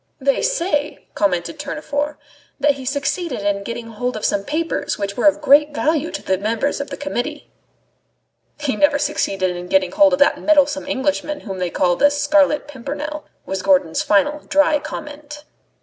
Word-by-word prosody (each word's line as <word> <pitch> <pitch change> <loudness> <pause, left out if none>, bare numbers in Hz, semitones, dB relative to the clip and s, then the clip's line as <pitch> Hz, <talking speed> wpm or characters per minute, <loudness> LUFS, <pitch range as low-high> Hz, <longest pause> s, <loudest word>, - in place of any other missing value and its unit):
"They 275 0 +1
say," 320 -11 -1
commented 185 - -1
Tournefort, 295 0 -3 0.4
"that 290 +1 +4
he 270 -2 -9
succeeded 280 - -2
in 200 0 0
getting 230 +2 -6
hold 245 +2 -3
of 215 - -3
some 200 -1 +1
papers 320 +8 -2
which 200 0 -3
were 245 - +2
of 300 +1 +3
great 295 +1 +5
value 310 +1 0
to - - -6
the 190 -1 0
members 230 +8 -1
of 280 - -6
the - - -6
Committee." 290 +1 -4 1.1
"He 285 -5 -1
never 290 +5 +3
succeeded 195 -11 -1
in 175 0 -7
getting 185 -1 +2
hold 295 -2 +5
of - - +3
that 285 - +3
meddlesome 290 -1 +3
Englishman 295 +2 -1
whom 195 -4 -6
they 180 -1 -1
call 175 0 +1
the 290 - +5
Scarlet 290 0 +2
Pimpernel," 295 +3 -6 0.2
was 190 -1 -3
Gourdon's 185 -4 +2
final 290 +9 +2
dry 295 +1 +3
comment. 295 0 -8
285 Hz, 170 wpm, -20 LUFS, 210-295 Hz, 1.1 s, great